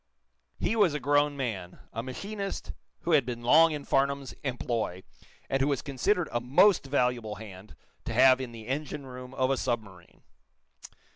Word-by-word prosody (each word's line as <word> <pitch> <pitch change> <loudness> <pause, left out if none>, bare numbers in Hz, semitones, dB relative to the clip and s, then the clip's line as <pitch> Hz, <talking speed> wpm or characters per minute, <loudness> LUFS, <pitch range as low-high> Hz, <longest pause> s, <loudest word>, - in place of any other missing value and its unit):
He - - 0
was 195 -9 +3
a - - -1
grown 145 +1 +2
man, 100 -9 -4 0.2
a 115 - -3
machinist 195 - -5 0.3
who 170 - -2
had 150 -4 +5
been 120 -1 -6
long 160 +7 +6
in 150 -2 -5
Farnum's 140 0 0
employ, 120 -8 -2 0.4
and 135 0 0
who 135 - +3
was 140 -3 0
considered 160 +6 0
a 120 - -1
most 140 - +4
valuable 125 -5 0
hand 100 -1 -11 0.3
to - - -3
have 130 +2 +6
in 125 -2 -5
the 115 -2 -10
engine 140 +1 -3
room 125 -1 -9
of 130 0 +1
a 135 - +1
submarine. 100 -9 -5
130 Hz, 165 wpm, -28 LUFS, 120-145 Hz, 0.4 s, long